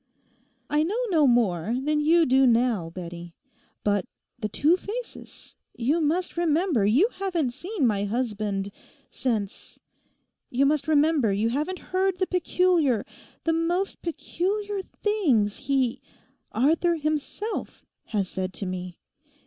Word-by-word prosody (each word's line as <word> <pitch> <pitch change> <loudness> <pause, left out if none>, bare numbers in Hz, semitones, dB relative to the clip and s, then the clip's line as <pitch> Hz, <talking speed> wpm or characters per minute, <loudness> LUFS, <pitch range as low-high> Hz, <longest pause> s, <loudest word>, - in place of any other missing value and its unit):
'I 295 +1 +3
know 370 +8 0
no 315 -6 +4
more 225 -3 +2
than 300 +3 +1
you 325 +2 +4
do 265 0 +4
now, 230 -7 +2
Bettie. 170 -1 -8 0.5
But 205 -2 +1 0.3
the 215 -3 -2
two 300 - +4
faces—you 365 - -4
must 335 +4 0
remember 325 - +2
you 285 - +4
haven't 350 - -1
seen 350 - -2
my 205 -3 +1
husband 210 -3 -2 0.4
since.' 220 -7 -3 0.7
You 265 +3 +2
must 300 +2 +1
remember 300 -6 +3
you 210 +3 +1
haven't 305 +10 -3
heard 375 0 +2
the 375 - +1
peculiar—the 340 - 0
most 345 +4 -1
peculiar 395 +4 -2
things 295 - +1
he—Arthur 275 +4 0
himself—has 305 - -3
said 185 0 -3
to 195 - -3
me. 180 -1 -5
280 Hz, 115 wpm, -26 LUFS, 215-345 Hz, 0.7 s, no